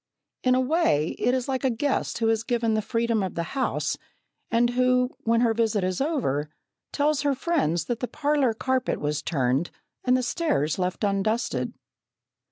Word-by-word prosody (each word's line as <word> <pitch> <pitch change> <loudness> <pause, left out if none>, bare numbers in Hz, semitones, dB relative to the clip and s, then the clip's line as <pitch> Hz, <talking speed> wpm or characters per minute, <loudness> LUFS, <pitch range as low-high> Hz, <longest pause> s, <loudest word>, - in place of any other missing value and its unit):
In 255 0 +4
a - - +3
way 255 - +2
it 245 - +2
is 255 -2 -2
like 265 -1 -2
a 265 - +3
guest 265 +4 -1
who 225 -1 +1
is 225 -1 +2
given 230 -2 0
the 215 - +1
freedom 230 0 0
of 190 -2 -3
the 170 - -1
house, 270 -2 -1 0.5
and 240 +1 +3
who, 250 0 +2
when 230 +1 +3
her 230 -2 +3
visit 220 -3 +1
is 185 +3 -1
over, 200 - 0 0.4
tells 295 0 +1
her 285 -1 +1
friends 175 - 0
that 240 -1 -2
the 250 - -2
parlour 285 -5 +1
carpet 260 +1 0
was 150 0 -1
turned, 135 0 0 0.3
and 250 0 +3
the 255 - -1
stairs 235 - 0
left 180 +3 -2
undusted. 210 +4 0
235 Hz, 175 wpm, -26 LUFS, 195-260 Hz, 0.5 s, In